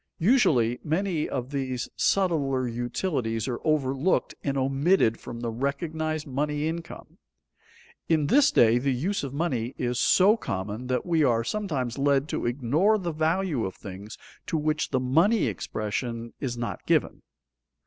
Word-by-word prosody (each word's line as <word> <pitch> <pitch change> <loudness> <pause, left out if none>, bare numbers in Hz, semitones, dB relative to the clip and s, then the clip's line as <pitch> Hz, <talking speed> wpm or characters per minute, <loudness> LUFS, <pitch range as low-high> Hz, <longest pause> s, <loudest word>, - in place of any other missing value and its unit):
Usually 145 - +3
many 165 0 -1
of 130 +1 -4
these 130 -3 -2
subtler 140 -9 +1
utilities 120 - -2
are 120 -2 -3
overlooked 150 +2 +1
and 140 -1 -1
omitted 135 -1 +2
from 115 0 -8
the 120 -1 -2
recognized 155 +5 -2
money 150 +2 -1
income. 165 0 -7 0.9
In 155 -3 +3
this 280 - +5
day 115 +1 +4
the 140 +2 -1
use 185 +10 -1
of 135 - -4
money 135 -6 -2
is 125 0 -1
so 200 +4 +5
common 105 - -4
that 125 0 -1
we 165 -3 +2
are 115 -4 +2
sometimes 140 - -3
led 140 0 +2
to - - -2
ignore 145 - +2
the 175 -4 -3
value 160 -3 0
of 95 - -4
things 100 +2 -9 0.3
to 160 - 0
which 155 0 0
the 130 - +1
money 165 - +3
expression 115 +2 -4
is 125 -4 -3
not 120 0 -4
given. - - +1
140 Hz, 150 wpm, -26 LUFS, 120-160 Hz, 0.9 s, this